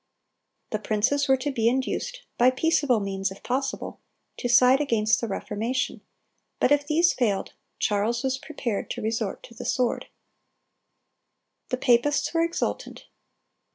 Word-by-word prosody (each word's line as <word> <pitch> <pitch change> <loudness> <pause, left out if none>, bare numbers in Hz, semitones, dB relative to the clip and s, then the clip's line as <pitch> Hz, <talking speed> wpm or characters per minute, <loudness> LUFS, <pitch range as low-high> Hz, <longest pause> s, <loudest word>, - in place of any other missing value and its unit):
The 215 - -1
princes 235 +8 +1
were 265 0 +4
to 280 +3 -2
be 230 -3 +2
induced, 380 - -2
by 245 +1 +5
peaceable 275 -2 +2
means 195 -1 -2
if 190 - -12
possible, 270 +2 -3 0.4
to - - -2
side 250 +3 +6
against 225 -6 +2
the 230 - -2
Reformation; 225 +5 -2 0.6
but - - +2
if 290 0 +3
these 335 +3 +3
failed, 210 -6 -1 0.2
Charles 215 +4 0
was 265 0 -1
prepared 240 -9 -4
to - - -4
resort 220 -2 -2
to - - -13
the 225 - -8
sword. 250 -2 0 1.6
The 255 - -1
papists 250 +6 +2
were 330 - +2
exultant. 335 +1 -2
250 Hz, 140 wpm, -26 LUFS, 220-280 Hz, 1.6 s, side